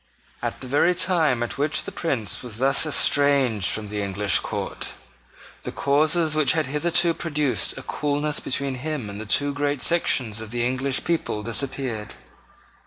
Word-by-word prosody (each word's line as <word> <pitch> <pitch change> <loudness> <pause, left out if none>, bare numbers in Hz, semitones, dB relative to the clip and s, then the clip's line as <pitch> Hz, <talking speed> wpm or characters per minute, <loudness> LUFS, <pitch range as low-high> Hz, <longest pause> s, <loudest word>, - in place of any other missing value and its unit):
At - - -4
the 130 - -7
very 145 +7 +3
time 160 -10 +2
at 120 - -5
which 145 +1 0
the - - -7
Prince 110 - -2
was 120 -4 -8
thus 135 +5 +3
estranged 140 -9 +3
from 105 -1 -2
the 105 0 -3
English 100 0 +2
court, - - -4 0.7
the - - -6
causes 155 +3 +1
which 155 -2 +3
had 160 -2 0
hitherto 165 +4 +2
produced 150 -8 -1
a - - -7
coolness 145 0 -1
between 135 +1 -2
him 145 -8 -4
and 100 +1 -7
the 110 - -8
two 145 +6 +2
great 145 -1 -1
sections 125 -10 +2
of 110 - -8
the 120 +1 -1
English 130 +1 -1
people 160 -10 -2
disappeared. 120 -2 -1
140 Hz, 165 wpm, -23 LUFS, 115-150 Hz, 0.7 s, very